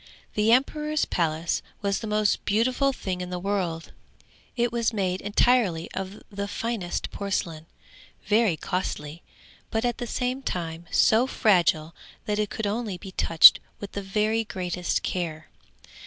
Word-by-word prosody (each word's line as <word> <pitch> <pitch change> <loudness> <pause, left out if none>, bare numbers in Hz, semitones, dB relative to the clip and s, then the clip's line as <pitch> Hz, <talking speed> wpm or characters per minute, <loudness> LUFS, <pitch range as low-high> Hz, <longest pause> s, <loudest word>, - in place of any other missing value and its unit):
The 215 +1 +2
emperor's 300 +4 +2
palace 165 -1 -1 0.2
was 200 -1 0
the 225 - -6
most 210 0 +1
beautiful 250 +6 +2
thing 185 -8 -4
in 180 - -5
the 180 - -3
world; 180 -3 -2 0.7
it 240 0 +1
was 235 -1 0
made 190 -4 -1
entirely 205 -5 +2
of 190 +2 -6
the 200 0 -4
finest 210 -5 -3
porcelain, 170 -5 -3 0.6
very 210 -4 +3
costly, 165 -3 -4 0.5
but 225 +2 -1
at 240 +1 -1
the 240 - -4
same 250 +3 -2
time 170 -6 -4
so 230 +4 +4
fragile 170 -9 +2 0.3
that 210 0 -1
it 210 -1 0
could 220 - -4
only 210 -2 -2
be 190 +1 -10
touched 165 -3 +7 0.2
with 200 - -7
the 200 - -4
very 215 +3 0
greatest 180 -4 -2
care. 160 -3 -3
200 Hz, 145 wpm, -26 LUFS, 175-225 Hz, 0.7 s, touched